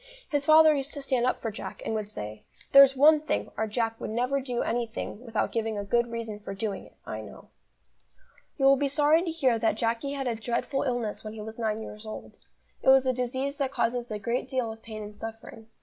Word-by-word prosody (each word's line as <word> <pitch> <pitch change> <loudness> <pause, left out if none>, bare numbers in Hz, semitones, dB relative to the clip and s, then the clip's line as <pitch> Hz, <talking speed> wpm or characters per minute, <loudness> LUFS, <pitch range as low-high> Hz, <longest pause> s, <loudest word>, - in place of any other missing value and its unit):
His 285 -1 0
father 315 0 +8
used 280 0 -3
to 285 - -5
stand 255 -3 +1
up - - -1
for 225 - -1
Jack, 210 - -8
and - - -1
would 215 -2 -3
say: 105 - -7 0.3
"There's 275 -1 +8
one 300 +3 +6
thing, 310 - -2
our 220 - -1
Jack 225 +1 -2
will - - -3
never 250 +5 0
do 250 -2 -2
anything 230 -1 -3
without 225 -3 -1
giving 225 -2 -1
a 205 - -2
good 235 +4 +1
reason 230 -2 -5
for 195 -1 -7
doing 200 -1 -4
it, - - -23
I 110 - -5
know." 110 - -12 1.1
You 270 - +1
will 275 0 +7
be 285 +1 +1
sorry 295 +3 +4
to 350 - -2
hear 265 -8 +1
that 225 -1 +2
Jacky 230 +5 -1
had 275 -1 -3
a 240 - +1
dreadful 235 +4 -2
illness 245 -5 -2
when 215 0 -6
he 220 - -7
was 220 +2 -8
nine 220 -1 -1
years 215 +1 -9
old. 215 - -8 0.5
It - - +3
was 265 0 +7
a 255 - +2
disease 260 +3 -2
that 270 -2 0
causes 240 -1 -1
a 215 - -3
great 235 +5 -2
deal 255 -4 -1
of 220 0 -11
pain 215 -2 -7
and 210 0 -9
suffering. 225 0 -9
235 Hz, 230 wpm, -28 LUFS, 220-270 Hz, 1.1 s, father